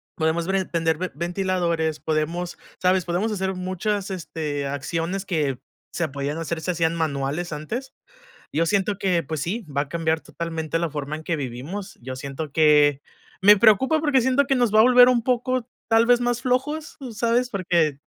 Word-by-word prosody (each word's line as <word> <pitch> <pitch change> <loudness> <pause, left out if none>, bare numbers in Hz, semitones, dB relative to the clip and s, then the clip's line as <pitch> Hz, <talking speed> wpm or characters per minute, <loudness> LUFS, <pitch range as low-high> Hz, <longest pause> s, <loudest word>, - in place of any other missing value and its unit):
podemos 165 +2 0
ver 190 -1 0
prender 165 -2 +1
ven 185 +1 -3
ventiladores, 170 -2 -1
podemos, 165 +3 -2 0.2
¿sabes? 185 0 +3
Podemos 180 +6 -1
hacer 190 -1 -2
muchas, 185 +2 -2
este, 155 -5 -4
acciones 165 +7 -3
que 150 -8 -1 0.4
se 170 -2 -1
podían 140 +2 -3
hacer 165 0 -3
se 180 - -1
hacían 165 -1 +1
manuales 155 +2 -2
antes. 235 - -5 0.6
Yo 165 +3 +2
siento 200 +2 +1
que, 180 -4 +1
pues 155 0 -4
sí, 205 +6 -3
va 140 -1 -1
a 145 - -6
cambiar 160 -1 0
totalmente 165 -1 -4
la 170 -2 -1
forma 145 0 -4
en 160 - -10
que 170 - -1
vivimos. 145 - -6
Yo 130 +2 -7
siento 140 +3 -6
que 150 -2 +4 0.4
me 205 +1 +8
preocupa 235 +9 +4
porque 290 -4 +3
siento 260 +3 +3
que 270 - +1
nos 240 -4 +1
va 215 - +6
a - - +8
volver 250 0 +7
un 240 -2 +2
poco, 255 0 0 0.2
tal 225 +1 +5
vez 245 0 +4
más 245 0 0
flojos, 295 +5 -1
¿tú 255 -3 -6
sabes? 235 +3 +1
Porque, 170 - +1
175 Hz, 180 wpm, -23 LUFS, 155-220 Hz, 0.6 s, me